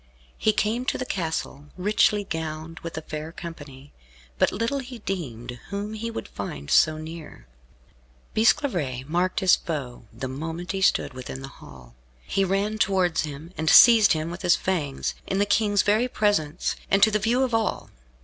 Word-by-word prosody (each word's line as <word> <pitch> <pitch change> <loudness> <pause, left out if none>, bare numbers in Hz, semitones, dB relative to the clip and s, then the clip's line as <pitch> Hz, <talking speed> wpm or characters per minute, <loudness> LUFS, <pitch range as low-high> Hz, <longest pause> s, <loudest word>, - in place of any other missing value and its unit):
He 215 - +3
came 215 +3 0
to - - 0
the 255 - -3
castle, 160 - -3
richly 205 +2 +2
gowned, 160 -2 -5
with 165 -1 -7
a 160 - -4
fair 155 +1 -6
company, 145 -5 -10 0.5
but - - +3
little 230 +7 -1
he 250 -2 -8
deemed 125 - -5
whom 205 +2 -4
he 225 +2 -4
would 230 - -6
find 70 +1 -6
so 155 0 +5
near. 155 - -9 0.9
Bisclavaret 175 - +1
marked 175 +4 0
his 190 -1 +6
foe 135 -8 -5
the 130 - -5
moment 160 +6 -5
he 195 -1 -3
stood 190 - +2
within 130 +1 -7
the - - -6
hall. 65 -3 -14 0.3
He 195 - +1
ran 200 +3 0
towards 185 -5 +2
him, 155 +4 -9
and 160 0 +1
seized 225 0 +8
him 160 +1 -3
with 175 - -7
his 175 - +4
fangs, 150 -8 -2
in 195 - -1
the 200 - +3
King's 205 -1 +2
very 215 +4 +2
presence, 195 -9 0
and 195 0 +4
to 220 - +6
the 210 - +1
view 235 +5 +2
of 255 -3 -1
all. 225 -3 -1
175 Hz, 175 wpm, -25 LUFS, 155-210 Hz, 0.9 s, seized